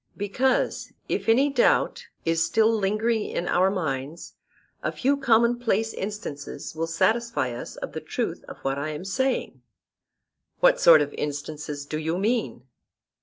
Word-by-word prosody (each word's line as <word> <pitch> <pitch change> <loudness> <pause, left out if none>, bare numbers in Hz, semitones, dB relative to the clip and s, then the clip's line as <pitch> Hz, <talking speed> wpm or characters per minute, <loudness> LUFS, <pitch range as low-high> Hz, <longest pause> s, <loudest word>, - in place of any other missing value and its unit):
Because, 245 +6 0
if - - -2
any 270 +5 +4
doubt 260 -3 +2 0.2
is 165 0 +2
still 220 +4 +3
lingering 215 +2 +1
in 175 - -3
our 185 +2 +3
minds, 155 -4 -4 0.5
a - - -1
few 275 +2 +1
commonplace 235 -4 +2
instances 190 -9 -6
will 165 +1 -2
satisfy 220 - +1
us 120 - -7
of - - -6
the - - -5
truth - - -3
of - - -9
what 135 +1 -1
I 150 +2 -3
am 155 +4 -6
saying. 260 +7 -1 1.0
What - - +5
sort 160 -3 +8
of 145 - -7
instances 145 0 -5
do 155 +1 -4
you 160 +2 -1
mean? 200 - -1
195 Hz, 145 wpm, -25 LUFS, 150-230 Hz, 1.0 s, sort